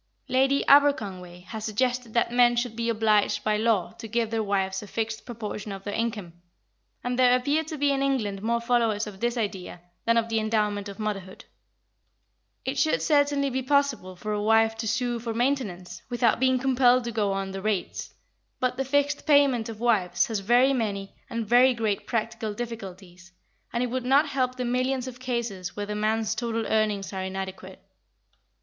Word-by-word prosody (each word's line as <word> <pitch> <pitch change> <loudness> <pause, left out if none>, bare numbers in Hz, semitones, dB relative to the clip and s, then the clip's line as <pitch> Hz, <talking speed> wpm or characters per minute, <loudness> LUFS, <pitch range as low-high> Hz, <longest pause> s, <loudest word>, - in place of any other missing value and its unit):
Lady 270 +2 +2
Aberconway 195 -11 +3
has 220 +3 -7
suggested 245 +2 -1
that 235 - +2
men 240 0 +4
should 240 -1 -2
be 235 0 -1
obliged 215 -2 +2
by 215 -1 +1
law 215 -4 +1
to 225 - -7
give 230 0 -1
their 225 -1 0
wives 195 -2 -1
a 210 - -10
fixed 225 +2 -4
proportion 215 -3 -6
of 195 0 -7
their 205 - -4
incomes, 210 -7 -3 0.7
and 245 +1 -2
there 250 -1 +6
appear 285 +5 0
to 315 0 -7
be 285 0 +2
in 275 -1 0
England 225 -8 -1
more 235 +2 0
followers 235 -3 +1
of 205 -3 -9
this 240 +2 -1
idea 195 -5 -4 0.3
than 230 0 +3
of 230 0 +2
the 225 -1 0
endowment 210 -2 -1
of 200 - -9
motherhood. 195 -3 -5 1.2
It 265 +1 -2
should 310 +3 +2
certainly 285 -2 +2
be 260 +1 -1
possible 260 -8 0
for 210 +4 -4
a 210 - -1
wife 225 +1 +3
to 225 0 -3
sue 240 +1 -1
for 230 -1 -4
maintenance, 235 -8 -2
without 240 -2 +2
being 260 0 +3
compelled 255 -1 +3
to 235 - -4
go 210 -3 0
on 195 0 -3
the 195 0 -5
rates, 210 -2 -2 0.5
but 255 0 0
the 270 - -1
fixed 285 +2 0
payment 275 -6 +4
of 220 -2 -8
wives 185 -7 +2
has 220 0 -2
very 245 +7 +4
many 200 -5 -2 0.2
and 230 -1 -3
very 245 +3 +5
great 215 -3 -2
practical 225 -2 -2
difficulties, 190 -6 -8 0.4
and 240 +1 0
it 245 - -2
would 255 0 -2
not 275 +4 +4
help 255 -2 0
the 250 -1 -3
millions 255 +1 0
of 245 -1 -8
cases 235 -8 -3
where 205 - -3
the 210 - -4
man's 215 +1 0
total 230 0 -2
earnings 210 -3 0
are 190 - -3
inadequate. 190 0 -6
230 Hz, 185 wpm, -26 LUFS, 205-250 Hz, 1.2 s, there